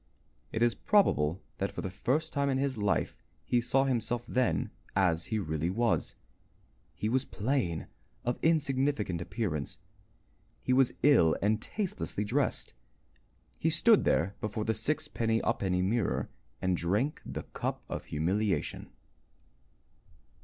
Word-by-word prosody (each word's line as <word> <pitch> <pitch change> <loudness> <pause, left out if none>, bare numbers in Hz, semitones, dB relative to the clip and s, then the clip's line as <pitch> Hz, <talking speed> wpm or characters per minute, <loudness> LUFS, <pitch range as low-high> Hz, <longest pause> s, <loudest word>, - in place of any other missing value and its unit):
It 115 - +1
is 120 -1 +4
probable 95 - +2 0.2
that 100 - -1
for - - -5
the 95 - -3
first 155 - 0
time 140 -1 +1
in 135 - +1
his 135 0 0
life 100 -6 0 0.3
he 120 - +2
saw 135 +3 +2
himself 120 -2 -1
then 125 +1 0 0.2
as 85 -4 +2
he 110 - -1
really 80 -4 -1
was. 115 +4 0 0.8
He 105 - -2
was 125 +3 +2
plain, 110 - -1 0.4
of 120 0 -1
insignificant 135 - +1
appearance, 90 - -3 0.9
he 125 - +2
was 130 -1 +4
ill 135 - +6
and 110 +2 +1
tastelessly 105 - -3
dressed. 130 +4 0 0.9
He - - +2
stood - - +5
there 90 +5 +2
before 105 0 -2
the 110 - +2
sixpenny 130 -6 0
ha'penny 90 -2 +1
mirror 105 +1 0 0.3
and 95 -1 +2
drank 105 - 0
the - - -5
cup - - -4
of - - -5
humiliation. 95 +7 -1
110 Hz, 130 wpm, -30 LUFS, 95-130 Hz, 0.9 s, ill